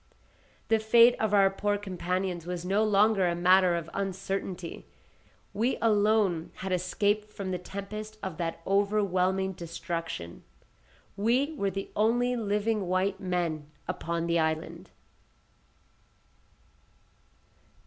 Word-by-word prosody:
The 225 0 +4
fate 230 +2 +6
of 220 -2 0
our 195 -2 +5
poor 205 +1 0
companions 185 -2 -3
was 180 -1 -4
no 200 +4 +2
longer 210 -2 +3
a 170 - 0
matter 180 0 +4
of 170 -1 -4
uncertainty. 190 -2 -4 0.7
We 235 +5 0
alone 210 -6 +2
had 190 0 -5
escaped 205 +4 0
from 195 -2 -5
the 180 - -2
tempest 210 +4 -7
of 185 -4 -4
that 165 -1 -3
overwhelming 190 -2 +1
destruction. 165 - -6 0.7
We 245 +9 +1
were 200 -8 0
the 195 +1 -5
only 240 +3 +2
living 210 -2 0
white 190 +2 0
men 170 -6 -2 0.2
upon 170 0 -2
the 170 0 +1
island. 160 0 -2
195 Hz, 115 wpm, -28 LUFS, 175-210 Hz, 0.7 s, fate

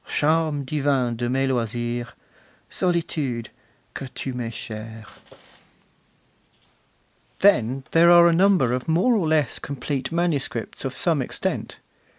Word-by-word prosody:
Charme 155 -2 +1
divin 135 -4 0
de 120 +1 -2
mes 135 +1 +1
loisirs, 120 -1 -2 0.6
Solitude! 155 -9 -2 0.4
que 135 - -6
tu 130 +1 -5
mes 120 -2 -4
chere! 110 -2 -8 2.4
Then 135 - +3
there 170 +1 +6
are 175 0 +8
a 170 - +4
number 180 -8 +3
of 125 0 -3
more 175 +10 +3
or 195 -8 +1
less 155 -5 +1
complete 140 +1 -4
manuscripts 170 -4 -2
of - - -4
some - - +1
extent. - - -3
135 Hz, 120 wpm, -23 LUFS, 120-165 Hz, 2.4 s, are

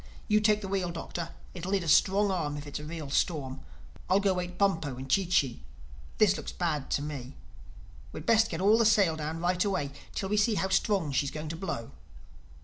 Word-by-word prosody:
You 210 -1 +4
take 210 0 +3
the 195 - -5
wheel, 190 -2 -1
Doctor: 170 0 -5 0.2
it'll 180 +1 -5
need 195 -3 +1
a - - -6
strong 195 +5 +4
arm 150 -6 -2
if 145 - -7
it's 145 - -5
a - - -8
real 155 -2 -6
storm. 135 -5 -1 0.5
I'll 190 +2 +5
go 200 -1 +2
wake 180 -1 -4
Bumpo 165 -9 +1
and 130 +1 -7
Chee 185 +7 +2
Chee. 140 - +1 0.6
This 200 -2 +4
looks - - -6
bad 155 -6 -2
to 145 - 0
me. 140 -3 -6 0.8
We'd - - -8
best 225 -1 +4
get 165 +1 -3
all 210 +4 +5
the 230 - +4
sail 200 -7 +4
down 160 +1 -4
right 180 +1 +1
away, 185 -9 -1 0.2
till 195 - -2
we 210 - +1
see 210 +1 +3
how 190 - 0
strong 195 -5 +1
she's 140 +1 +1
going 155 +2 -6
to 165 - -4
blow." 160 -10 -5
175 Hz, 215 wpm, -29 LUFS, 150-195 Hz, 0.8 s, I'll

